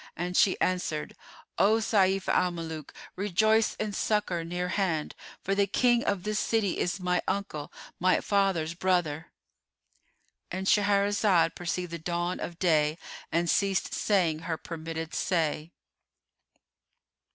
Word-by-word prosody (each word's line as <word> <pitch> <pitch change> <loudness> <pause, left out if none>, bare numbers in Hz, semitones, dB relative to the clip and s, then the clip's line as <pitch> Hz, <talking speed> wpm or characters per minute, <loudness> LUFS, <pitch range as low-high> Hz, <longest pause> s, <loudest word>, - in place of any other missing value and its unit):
and 180 +2 -3
she 190 - +4
answered, 180 -4 -1 0.4
"O 210 +2 +5
Sayf 195 -3 +2
al 180 - +3
Muluk, 160 -3 -6 0.2
rejoice 215 +3 +2
in 215 -1 -3
succour 205 -5 0
near 180 +2 -3
hand; 180 -6 -1 0.3
for 195 - 0
the 200 0 +2
King 240 +4 +3
of 195 -3 -1
this 210 0 -1
city 220 -5 0
is 175 +2 -1
my 180 -1 0
uncle, 195 -7 -3 0.3
my 185 +1 +3
father's 195 -6 +1
brother."——And 175 +2 -5
Shahrazad 200 -3 +3
perceived 175 0 -3
the 170 - -5
dawn 175 +2 -2
of 170 - -6
day 155 -3 +2 0.3
and 170 +1 +1
ceased 195 +2 +1
saying 175 -7 +1
her 165 0 -3
permitted 165 0 -6
say. 165 -3 -1
180 Hz, 125 wpm, -28 LUFS, 165-200 Hz, 0.4 s, O